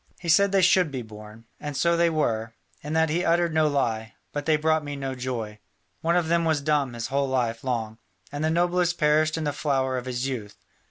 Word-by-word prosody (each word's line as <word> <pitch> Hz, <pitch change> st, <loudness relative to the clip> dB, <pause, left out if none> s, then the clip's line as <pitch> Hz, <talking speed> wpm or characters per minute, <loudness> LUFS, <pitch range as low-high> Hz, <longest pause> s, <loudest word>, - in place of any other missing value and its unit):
He 170 Hz, -, -5 dB
said 200 Hz, +4 st, +5 dB
they 195 Hz, -1 st, +3 dB
should 180 Hz, -2 st, +4 dB
be 130 Hz, -3 st, -4 dB
born. 110 Hz, +1 st, -12 dB
And 145 Hz, -2 st, -5 dB
so 170 Hz, +4 st, +3 dB
they 170 Hz, 0 st, +3 dB
were; 115 Hz, -8 st, -1 dB, 0.3 s
in 150 Hz, +2 st, -5 dB
that 160 Hz, -1 st, +2 dB
he 175 Hz, +3 st, 0 dB
uttered 170 Hz, -1 st, +2 dB
no 155 Hz, -1 st, +3 dB
lie, 115 Hz, -6 st, -1 dB, 0.2 s
but 145 Hz, +1 st, -4 dB
they 155 Hz, -1 st, +4 dB
brought 155 Hz, 0 st, +1 dB
me 145 Hz, -1 st, -5 dB
no 135 Hz, -1 st, -4 dB
joy. 120 Hz, -5 st, -5 dB, 0.4 s
One 170 Hz, +1 st, +1 dB
of 175 Hz, -2 st, +1 dB
them 170 Hz, +1 st, +2 dB
was 160 Hz, -2 st, +1 dB
dumb 145 Hz, -3 st, 0 dB
his 115 Hz, -1 st, -5 dB
whole 140 Hz, 0 st, 0 dB
life 120 Hz, -3 st, -1 dB
long, 115 Hz, -3 st, -3 dB, 0.3 s
and 145 Hz, +1 st, -4 dB
the 155 Hz, -, +2 dB
noblest 175 Hz, +1 st, +1 dB
perished 155 Hz, +1 st, +2 dB
in 160 Hz, -, -2 dB
the 145 Hz, -1 st, -1 dB
flower 130 Hz, -4 st, 0 dB
of 125 Hz, -, -10 dB
his 125 Hz, +1 st, -2 dB
youth. 110 Hz, -7 st, -5 dB
145 Hz, 225 wpm, -25 LUFS, 125-160 Hz, 0.4 s, said